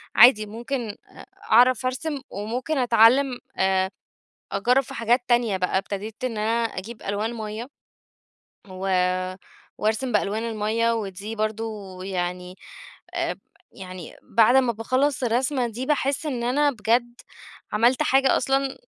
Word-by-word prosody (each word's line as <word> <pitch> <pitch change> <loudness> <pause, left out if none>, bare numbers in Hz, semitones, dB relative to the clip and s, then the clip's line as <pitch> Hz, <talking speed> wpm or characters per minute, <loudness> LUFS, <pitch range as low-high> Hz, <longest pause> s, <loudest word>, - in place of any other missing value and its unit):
عادي 215 -2 +7
ممكن 235 +2 -4
أ 205 - -12 0.3
أعرف 250 +2 +5
أرسم، 270 +3 -2
وممكن 245 +9 -3
أتعلم 245 +2 +4 0.2
آآ 190 0 +2 0.6
أجرب 250 +7 +2
في - - -10
حاجات 235 +2 +2
تانية 235 -5 +2
بقى، 185 +1 0
ابتديت 205 +4 -5
إن 245 -4 -2
أنا 225 +2 +1
أجيب 225 +2 -6
ألوان 210 +4 -2
مَيّة، 220 +1 -5 1.0
و 185 +1 -5 0.9
وأرسم 220 +4 0
بألوان 210 +1 0
المَيّة 225 +2 0
ودي 205 +1 -5
برضه 215 -3 -4
يعني 180 -1 -4 0.6
آآ - - -1 0.4
يعني 185 -3 -9
بعد 230 +2 +4
ما 250 -3 +3
باخلص 255 +5 0
الرسمة 250 +2 +1
دي 235 +3 -5
باحس 285 +1 0
إن 250 -5 -2
أنا 285 +4 +2
بجد 240 +1 0 0.5
عملت 235 +4 +3
حاجة 270 0 +3
أصلًا 270 +1 0
230 Hz, 125 wpm, -24 LUFS, 210-255 Hz, 1.0 s, عادي